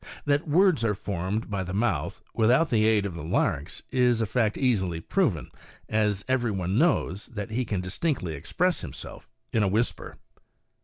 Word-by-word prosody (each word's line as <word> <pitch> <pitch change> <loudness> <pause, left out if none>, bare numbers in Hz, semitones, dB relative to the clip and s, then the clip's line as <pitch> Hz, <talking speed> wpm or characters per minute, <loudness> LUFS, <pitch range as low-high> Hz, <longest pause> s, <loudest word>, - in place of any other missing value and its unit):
That 145 +3 +1
words 170 - +4
are 105 -3 +1
formed 95 +3 -3
by 100 -2 -2
the 90 +1 -5
mouth, 100 -9 -1
without 125 +9 +3
the 110 -2 +4
aid 105 -2 +3
of 100 - -3
the 85 - -7
larynx, 80 - -1
is 125 -2 +3
a 115 - +1
fact 110 -1 0
easily 95 -11 +1
proven, 95 - 0 0.4
as 105 -2 0
every 130 -2 +1
one 95 +1 0
knows 110 - +1
that 105 -5 -6
he 125 +3 -1
can 100 -4 -2
distinctly 95 - -2
express 175 - 0
himself 75 -6 -9 0.2
in 110 - +3
a 105 - +3
whisper. 110 +5 -1
110 Hz, 170 wpm, -27 LUFS, 95-125 Hz, 0.4 s, words